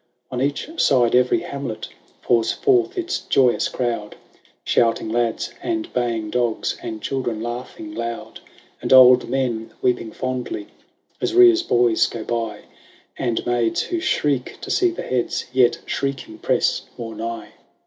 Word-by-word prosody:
On 125 - -2
each 140 - -1
side 120 -3 +3
every 125 +7 +3
hamlet 140 -9 -5 0.3
Pours 115 -2 +2
forth 375 -1 +2
its 355 0 -1
joyous 135 -10 +2
crowd. 115 -4 -3 0.5
Shouting 115 -1 +1
lads 115 0 -1
and 330 -2 -3
baying 115 -3 -1
dogs. 120 -2 0
And 110 -2 -6
children 120 -5 -2
laughing 125 - -6
loud. 115 - -5 0.4
And - - -3
old 125 -1 +8
men 120 -4 -1
weeping 120 -3 0
fondly 125 -4 -4 0.6
As - - -1
Rhea's 360 -1 +7
boys 120 - +3
go 115 - -6
by. 115 -2 -3 0.5
And 120 -3 -2
maids 120 -2 +1
who 350 - -2
shriek 145 - 0
to - - -5
see 370 -1 +3
the 345 - -6
heads, 125 -2 -1
Yet, 125 -2 +4
shrieking, 135 -5 -4
press - - +1 0.2
more 115 -1 -6
nigh. 115 +1 -5
125 Hz, 140 wpm, -22 LUFS, 115-140 Hz, 0.6 s, old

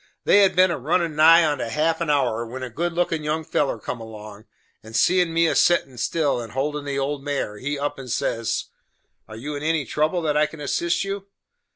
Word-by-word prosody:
They 205 - +5
had 195 - +3
been 185 0 +5
a - - -3
runnin' 165 +3 0
nigh 165 +2 +7
onto 145 -5 -1
half 160 +7 0
an 165 - -1
hour, 125 -6 +1
when 125 +3 -7
a 125 - -6
good 170 +8 -2
lookin' 165 -2 -1
young 155 +1 -1
feller 135 -5 0
come 115 +2 -6
along, 110 -1 -10 0.4
and 110 +1 -11
seein' 180 +2 +3
me 165 +1 +3
a 165 - +2
settin' 135 -8 +2
still 140 +1 0
and 115 -2 -9
holdin' 145 +2 -2
the 140 -1 -3
old 140 0 -2
mare, 140 -7 -3
he 145 +2 -3
up 145 0 -3
and 130 -2 -8
says: 115 0 -2 0.6
"Are 110 - -10
you 145 +6 -5
in 145 - -5
any 155 -2 0
trouble 155 +5 0
that 150 -2 0
I 150 0 +3
can 155 +1 -12
assist 170 +5 0
you?" 195 0 -5
150 Hz, 220 wpm, -23 LUFS, 125-165 Hz, 0.6 s, nigh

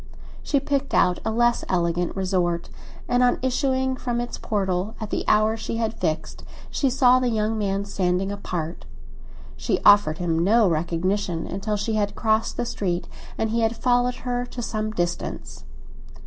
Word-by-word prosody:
She 285 - +1
picked 275 -1 -1
out 180 -1 +3
a - - -1
less 240 +1 +2
elegant 175 -1 0
resort, 180 -3 -1 0.4
and 245 0 +2
on 245 0 +4
issuing 260 0 +1
from 245 -2 -2
its 240 0 -3
portal 195 0 -1
at 215 -2 -6
the - - -1
hour 215 +1 +4
she 225 0 -4
had 225 -1 -1
fixed 160 -8 -3 0.3
she 275 - +1
saw 255 0 +5
the 250 -1 +1
young 220 -1 0
man 200 -2 -1
standing 190 -1 0
apart. 175 -5 -5 0.7
She - - 0
offered 205 -7 +6
him 170 -1 0
no 220 +3 +4
recognition 175 +2 -1
till 210 +1 -1
she 205 +2 -2
had 205 - -2
crossed 220 0 0
the - - -1
street 180 -6 -2 0.3
and 220 -1 -1
he 230 +1 +1
had 225 +1 +1
followed 245 0 +2
her 245 0 -1
to 245 -1 -6
some 215 -1 -2
distance. 175 - -4
215 Hz, 165 wpm, -24 LUFS, 180-240 Hz, 0.7 s, offered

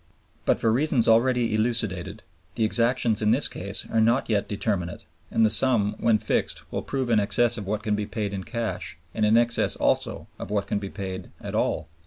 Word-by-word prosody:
But - - +2
for 115 - +2
reasons 130 0 +2
already 120 0 +3
elucidated, 110 -3 -1 0.3
the 115 - 0
exactions 115 0 +2
in 105 - +2
this 120 +4 +5
case 100 +2 -5
are 115 - +1
not 115 +3 +2
yet 100 -2 +1
determinate, 100 -4 -2 0.3
and 115 - +3
the - - +4
sum 110 -3 +2
when 115 -2 +3
fixed - - -2
will - - -2
prove 130 -3 -2
in 110 - +4
excess 120 +3 +3
of 105 -4 -5
what 105 +1 -2
can 105 -2 0
be 105 0 -3
paid 105 -3 -3
in 95 -1 -4
cash 115 -8 -4 0.2
and 110 -1 +1
in 110 +2 +5
excess 120 0 +2
also - - 0
of - - -6
what 100 -1 -1
can 100 - -1
be 100 -1 -6
paid 95 -2 -6
at - - -7
all. 80 - -1
110 Hz, 205 wpm, -25 LUFS, 100-115 Hz, 0.3 s, this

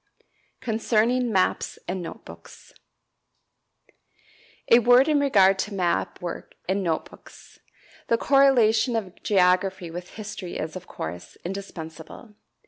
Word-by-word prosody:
Concerning 235 +1 +1
Maps 190 -3 0
and 180 +1 -3
Note 170 - -9
Books. - - -14 2.0
A 235 - +9
word 245 +3 +5
in 300 -2 +3
regard 195 -9 +4
to 205 +1 -3
map 180 -3 -1
work 175 - -6
and 195 +2 0
note 165 -4 -1
books. - - -17 0.5
The 230 - +2
correlation 245 -4 +4
of 195 -5 -5
geography 185 -2 +2
with 175 +1 -8
history 210 -4 -7
is, 155 +2 -5
of 185 0 -8
course, 85 +2 -7
indispensable. 175 +1 -8
195 Hz, 120 wpm, -25 LUFS, 180-230 Hz, 2.0 s, A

